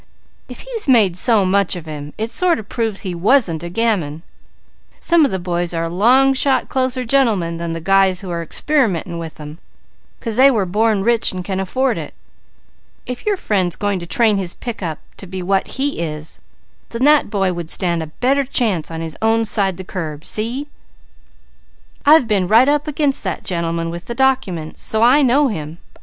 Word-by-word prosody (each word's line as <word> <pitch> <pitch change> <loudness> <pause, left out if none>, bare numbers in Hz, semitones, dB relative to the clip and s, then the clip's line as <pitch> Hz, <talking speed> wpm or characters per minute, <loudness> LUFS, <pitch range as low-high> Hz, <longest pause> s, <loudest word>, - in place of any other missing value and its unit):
"If - - -9
he's 485 -7 -5
made 215 -9 +4
so 210 +1 +3
much 195 0 +1
of 170 -2 -8
him, 150 -1 -8
it 220 +2 -3
sort 355 +6 +2
of 215 -3 -8
proves 225 -4 -3
that 190 - -3
he - - -3
wasn't 180 - +2
a 175 - -6
gamin. 175 -7 -1 0.8
Some 340 -2 +3
of - - 0
the 190 - -2
boys 175 -1 -2
are 165 - -1
a 165 - -2
long 250 +10 +4
shot 270 0 +1
closer 255 -1 -1
gentlemen 220 -10 +1
than 170 0 -4
the 165 - -5
guys 195 0 +2
who 185 -3 -6
are 170 -1 -2
experimenting 185 - -1
with 165 -1 -7
them; 150 +2 -10 0.6
'cause 230 -2 -4
they 270 +2 +7
were 220 -7 +1
born 210 +2 +1
rich 235 +1 +2
and 185 -2 -6
can 190 0 -2
afford 260 +8 0
it. - - -8 0.9
If 250 +9 -7
your 410 -2 +1
friend's 190 - 0
going 205 -2 -1
to 170 - -8
train 220 +1 +2
his 185 -3 -3
pick 235 -4 -6
up 160 -4 -3 0.2
to 195 - -10
be 185 0 -6
what 190 +1 0
he 285 +2 -1
is, 155 -2 -5 0.5
then 230 +2 -3
that 295 -3 +4
boy 195 -3 0
would 170 -2 -6
stand 170 -2 -1
a 160 - -5
better 265 - 0
chance 225 - 0
on 165 0 -5
his 165 -1 -6
own 225 +1 +2
side 195 -4 0
the 190 - -7
curb. 155 -5 -6
See? 235 +6 -2 1.4
I've 300 -5 +6
been 200 -4 +1
right 230 +6 +5
up 295 +1 +1
against 290 -2 -1
that 185 -5 -4
gentleman 165 -2 -2
with 170 +1 -7
the 235 - -6
documents, 235 -12 -1
so 220 +1 +1
I 255 +5 +6
know 275 +2 +3
him. 160 -5 -6
200 Hz, 200 wpm, -18 LUFS, 170-250 Hz, 1.4 s, they